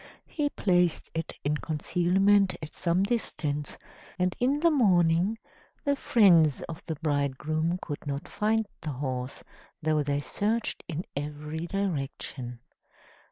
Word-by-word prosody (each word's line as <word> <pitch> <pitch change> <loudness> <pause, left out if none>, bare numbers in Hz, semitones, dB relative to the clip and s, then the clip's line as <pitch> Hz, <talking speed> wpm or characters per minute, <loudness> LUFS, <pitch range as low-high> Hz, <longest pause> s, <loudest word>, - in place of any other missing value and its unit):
He 295 -2 -1
placed 180 - +1
it 165 0 -3
in 150 +1 +1
concealment 185 +5 +2
at 155 - -7
some 175 +2 +1
distance, 155 -10 -2 0.4
and 180 -1 +1
in 270 +4 +2
the 335 0 +5
morning 185 - +3 0.5
the 285 0 +3
friends 170 - +5
of 165 -1 -7
the 160 - -3
bridegroom 155 +3 0
could 145 -2 -6
not 140 +5 -3
find 220 +1 +1 0.2
the 155 -2 -3
horse, 130 -1 -4 0.4
though 155 -1 +1
they 145 0 0
searched 210 - -1
in 165 +2 -4
every 150 +3 -4
direction. 135 -9 -3
165 Hz, 125 wpm, -28 LUFS, 150-195 Hz, 0.5 s, the